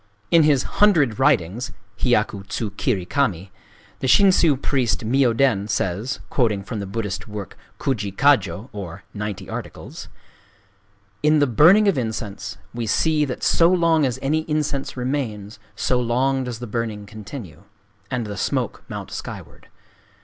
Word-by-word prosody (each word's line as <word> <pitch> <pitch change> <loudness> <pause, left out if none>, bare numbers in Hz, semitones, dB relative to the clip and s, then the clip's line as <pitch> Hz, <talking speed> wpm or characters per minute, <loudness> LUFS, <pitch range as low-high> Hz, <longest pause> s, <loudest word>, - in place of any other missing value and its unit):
In 165 - +7
his 150 -4 +4 0.2
"Hundred 155 - +4
Writings 125 - +1 0.3
"(Hyaku 105 -5 +1
tsū 105 -1 -4
kiri 100 -7 -1
kami), 95 -7 -1 0.5
the 130 - -2
Shinshū 170 -4 +5
priest 130 -4 0
Myōden 120 -4 +2
says, 100 +7 -2
quoting 110 -6 +1
from 110 +1 -5
the 100 - -4
Buddhist 100 -3 -4
work 105 -2 -7 0.2
Kujikkajō, 105 -3 +1
or 100 -2 -7
"Ninety 100 -2 -5
Articles - - -7 0.6
":— 100 0 -38
"In 150 +1 +4
the 145 - +4
burning 170 - +6
of 190 -9 +3
incense 105 -3 -4 0.2
we 115 -1 -3
see 155 +6 +2
that 130 - -5
so 165 0 +4
long 165 -3 +3
as 130 -4 0
any 150 +4 +2
incense 150 -3 -2
remains, 115 -5 -3 0.2
so 125 +3 +1
long 130 +2 +1
does 125 -2 -4
the 120 - -6
burning 110 -2 -3
continue, 100 - -10 0.4
and 125 -3 -2
the 105 -1 -6
smoke - - -2
mount - - -6
skyward. - - -8
120 Hz, 140 wpm, -22 LUFS, 100-140 Hz, 0.6 s, In